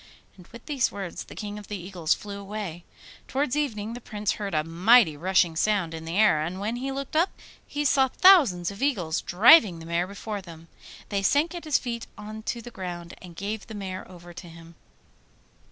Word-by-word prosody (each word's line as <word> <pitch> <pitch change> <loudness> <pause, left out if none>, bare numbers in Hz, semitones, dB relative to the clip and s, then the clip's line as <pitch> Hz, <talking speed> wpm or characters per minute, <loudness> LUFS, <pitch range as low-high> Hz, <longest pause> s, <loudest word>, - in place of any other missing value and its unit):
And 180 -2 -16
with 235 0 -13
these 285 -5 0
words 195 -4 -6
the - - -12
King 210 0 -6
of 205 - -12
the 205 - -4
Eagles 175 -3 -1
flew 200 -1 -8
away. 200 -4 -6 0.4
Towards 275 0 -1
evening 230 -7 -2
the 245 - -8
Prince 210 -2 -2
heard 200 -5 -4
a 155 - +2
mighty 175 +2 +4
rushing 175 +1 +2
sound 190 -2 +1
in 160 0 -7
the 165 +3 -3
air, 210 -8 +4
and 175 +4 -4
when 220 +4 -2
he 270 +2 -3
looked 275 +2 -5
up 335 +4 +3 0.4
he 295 0 -3
saw 270 -1 +4
thousands 255 - +5
of 200 - -11
eagles 185 - 0
driving 210 - +6
the 165 - -10
mare 170 +2 -1
before 200 +1 -6
them. 165 -2 -13 0.4
They 200 -1 -1
sank 290 - +2
at 345 -2 -7
his 305 -3 +3
feet 235 -2 -5
on 215 +1 -8
to 235 - -3
the 245 - -9
ground 175 -4 -7
and 175 -2 -12
gave 200 +3 -5
the 220 - -8
mare 190 -2 -6
over 175 -1 -12
to 175 0 -10
him. 165 0 -14
200 Hz, 205 wpm, -26 LUFS, 175-235 Hz, 0.4 s, driving